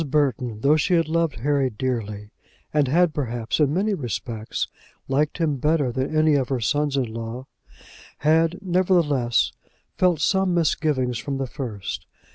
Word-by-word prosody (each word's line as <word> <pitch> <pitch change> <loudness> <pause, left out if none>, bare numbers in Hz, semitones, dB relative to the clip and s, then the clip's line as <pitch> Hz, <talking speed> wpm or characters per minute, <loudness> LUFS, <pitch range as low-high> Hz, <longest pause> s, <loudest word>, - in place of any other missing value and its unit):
Burton, 125 -6 0
though 145 +4 +4
she 180 +3 +2
had 165 -1 +2
loved 165 -5 0
Harry 140 -1 +2
dearly, 105 -3 -4 0.4
and 150 -2 +3
had 165 +4 +3
perhaps 120 -4 -2
in 145 -2 +3
many 200 +6 +1
respects 115 - -3 0.4
liked 145 +3 0
him 155 -5 0
better 150 -1 +1
than 130 +5 -2
any 155 0 +4
of 135 -3 +1
her 130 -2 0
sons 145 +4 0
in 135 - +2
law, 115 +3 -6 0.7
had, 160 +3 +2
nevertheless, 170 -10 +2 0.5
felt 180 -4 +3
some 190 +2 +2
misgivings 140 -7 +1
from 140 -1 -3
the 135 - -1
first. 120 -8 -6
145 Hz, 150 wpm, -23 LUFS, 125-160 Hz, 0.7 s, though